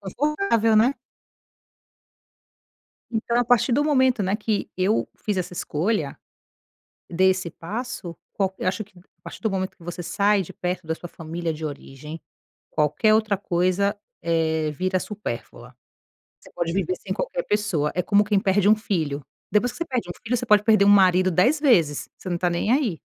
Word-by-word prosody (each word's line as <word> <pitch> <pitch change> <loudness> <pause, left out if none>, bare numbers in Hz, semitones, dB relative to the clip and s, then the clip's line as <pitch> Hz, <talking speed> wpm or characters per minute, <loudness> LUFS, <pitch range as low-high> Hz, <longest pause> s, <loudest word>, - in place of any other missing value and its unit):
confortável, 230 - +1
né. 245 +6 +4 2.2
Então 235 +1 -1
a 245 - +3
partir 240 +1 +3
do 290 +4 +3
momento, 260 -6 +3
né, 190 +3 0
que 215 -1 -2
eu 190 +4 +1
fiz 210 -2 -3
essa 180 -1 -3
escolha 165 -2 -1 0.9
desse 185 0 +2
passo, 205 -1 -6 0.2
qualque 190 -1 -2
eu - - +2
acho 205 +3 -2
que 195 -3 -16
a 180 - -25
partir - - -10
do 220 - 0
momento 190 -1 -3
que 170 - -17
você 175 0 -5
sai 200 +3 +2
de 175 - -10
perto 180 0 -3
da 160 - -1
sua 175 - -9
família 165 +1 -4
de 155 +1 -7
origem, 150 +1 -7 0.5
qualquer 155 +8 +2
outra 215 -2 +2
coisa, 185 +2 0 0.3
eh, 160 -2 0
vira 185 +5 0
supérflua. 125 - -7 0.6
Você - - -17
pode 170 -1 -2
viver 280 - 0
sem - - -5
qualquer - - -3
pessoa. 200 -8 0
É 180 - +2
como 200 +3 +3
quem 205 -1 +2
perde 200 0 +2
um 215 - +7
filho. 160 -10 -2 0.3
Depois 235 +4 +2
que - - -12
você 335 - -1
perde 250 -8 -2
um - - -4
filho, 240 +2 0
você 245 - -3
pode 210 -2 +5
perder 215 -2 +5
um - - +6
marido 185 -2 +5
10 255 - +3
vezes, 170 - +2
você 185 - -7
não 175 - 0
está 175 0 +1
nem 175 +6 0
aí. 250 - +1
195 Hz, 180 wpm, -24 LUFS, 170-220 Hz, 2.2 s, um